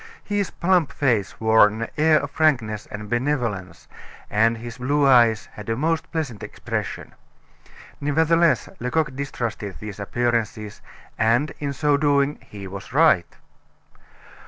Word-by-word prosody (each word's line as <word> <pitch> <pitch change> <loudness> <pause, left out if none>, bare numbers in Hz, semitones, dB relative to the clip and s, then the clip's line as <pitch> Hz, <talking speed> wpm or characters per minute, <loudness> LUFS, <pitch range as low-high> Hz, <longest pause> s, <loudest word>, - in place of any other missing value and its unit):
His 205 -2 -1
plump 175 -4 +1
face 115 -8 0
wore 110 -1 +6
an 110 +2 -4
air 155 0 +4
of 145 - -6
frankness 120 -10 +1
and 105 0 -7
benevolence, 120 -6 -2 0.4
and 115 +2 +3
his 115 +1 -9
blue 145 +3 +1
eyes 120 -5 +4
had 105 +1 -9
a 115 - +1
most 160 +5 -1
pleasant 145 -10 -3
expression. - - -5 0.9
Nevertheless, 160 +3 +2
Lecoq 150 +2 -1
distrusted 120 -8 -4
these 105 -1 -8
appearances, 115 -1 -2 0.4
and 120 +7 +2
in 145 -1 -2
so 145 +1 +1
doing 145 0 +1
he 100 -1 -10
was 95 +3 -9
right. 145 - +3
125 Hz, 130 wpm, -23 LUFS, 110-150 Hz, 0.9 s, wore